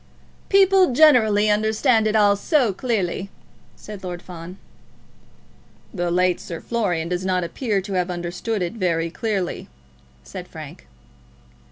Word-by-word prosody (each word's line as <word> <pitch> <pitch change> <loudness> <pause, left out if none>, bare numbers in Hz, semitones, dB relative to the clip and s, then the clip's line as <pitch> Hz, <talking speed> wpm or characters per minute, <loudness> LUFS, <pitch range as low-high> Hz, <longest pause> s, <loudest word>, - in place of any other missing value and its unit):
"People 385 -5 +5
generally 230 -8 +5
understand 220 +2 +2
it 215 - 0
all 205 -1 +5
so 245 - +1
clearly," 200 -4 -2 0.5
said 210 -2 -10
Lord 175 -1 -5
Fawn. 180 +1 -10 1.4
"The 175 -3 -2
late 180 +1 +2
Sir 165 -2 -7
Florian 185 -9 -1
does 180 +1 -2
not 185 -1 0
appear 200 +4 -2
to 195 +1 -7
have 180 -1 0
understood 180 +4 -3
it 175 - -3
very 170 -6 -1
clearly," 200 -3 -3 0.6
said - - -9
Frank. - - -11
200 Hz, 130 wpm, -22 LUFS, 180-225 Hz, 1.4 s, People